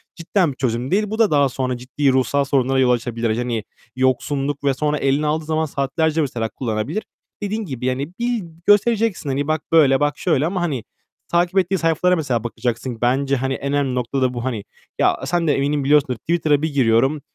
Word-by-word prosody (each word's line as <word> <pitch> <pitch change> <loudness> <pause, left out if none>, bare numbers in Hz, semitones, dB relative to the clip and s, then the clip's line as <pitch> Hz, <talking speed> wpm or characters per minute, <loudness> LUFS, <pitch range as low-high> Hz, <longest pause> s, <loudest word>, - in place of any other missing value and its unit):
cidden 170 -1 0
bir 130 - -12
çözüm 125 +1 -2
değil. 210 +1 +1
Bu 220 +1 -4
da 220 -6 +4
daha 140 -2 +3
sonra 130 -1 -2
ciddi 135 +2 0
ruhsal 130 +2 +2
sorunlara 135 -1 +1
yol 125 -1 +4
açabilir. 115 -2 -1
Hani, 120 -3 -2 0.3
yoksunluk 135 +2 0
ve 140 -1 +2
sonra 150 +2 -1
eline 140 +2 +1
aldığı 155 +1 -1
zaman 160 0 0
saatlerce 155 +3 0
mesela 120 -5 -2
kullanabilir. 120 - -3 0.4
Dediğin 210 +1 -2
gibi, 130 -5 -5
yani, 135 +5 -2
bil 240 -4 -1 0.2
göstereceksin, 205 -5 +3
hani, 140 +2 -1
bak 155 0 0
böyle, 140 -5 +5
bak 145 0 0
şöyle 155 -5 +1
ama, 180 +1 -1
hani, 140 -9 -2 0.4
takip 175 +2 +1
ettiği 190 +1 +2
sayfalara 165 +2 +2
mesela 130 -8 -1
bakacaksın. 120 0 -3
Bence, 135 +3 +1
hani, 135 +1 -1
en 140 +1 -3
önemli 135 -3 0
nokta 125 +2 -2
da 125 -1 +1
bu, 120 -1 -4
hani. 115 -6 -3 0.4
Ya, - - +3
sen 170 -2 0
de 145 - +4
eminim 140 +1 0
biliyorsundur. 140 -3 +3
Twitter'a 155 -3 +1
bir 160 -2 -2
giriyorum. 135 +3 +2
140 Hz, 195 wpm, -20 LUFS, 130-160 Hz, 0.4 s, böyle